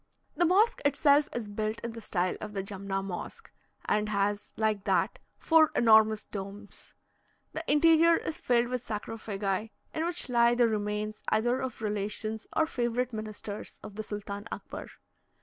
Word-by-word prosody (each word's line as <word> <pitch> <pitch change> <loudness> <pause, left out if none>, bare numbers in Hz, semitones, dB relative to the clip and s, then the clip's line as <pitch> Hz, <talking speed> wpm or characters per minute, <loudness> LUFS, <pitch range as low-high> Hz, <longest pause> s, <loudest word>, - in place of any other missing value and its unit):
The 350 - +3
mosque 405 +7 +3
itself 285 +1 +4
is 235 -3 -4
built 215 +2 -3
in 235 - -4
the 230 0 -9
style 185 -3 -1
of 210 -1 -6
the 195 -1 -2
Jumna 195 -1 -3
Mosque, 195 - -7 0.3
and 210 0 +1
has, 205 0 0
like 215 -2 +1
that, - - +1 0.2
four 320 -2 +5
enormous 220 -2 +5
domes. 200 +1 -8 0.6
The 320 - -4
interior 330 +2 +6
is 315 - -4
filled 240 -1 +2
with 250 -1 -2
sarcophagi, 210 -2 -3 0.2
in 315 - -1
which 345 0 -2
lie 240 -1 +4
the 240 -1 +4
remains 210 0 -2
either 240 +4 +2
of 255 -3 -5
relations 210 +1 -3
or 320 - +4
favourite 245 -3 -1
ministers 215 -1 -6
of 210 - -8
the 215 - -4
Sultan 205 0 -6
Akbar. - - -7
220 Hz, 155 wpm, -29 LUFS, 205-250 Hz, 0.6 s, interior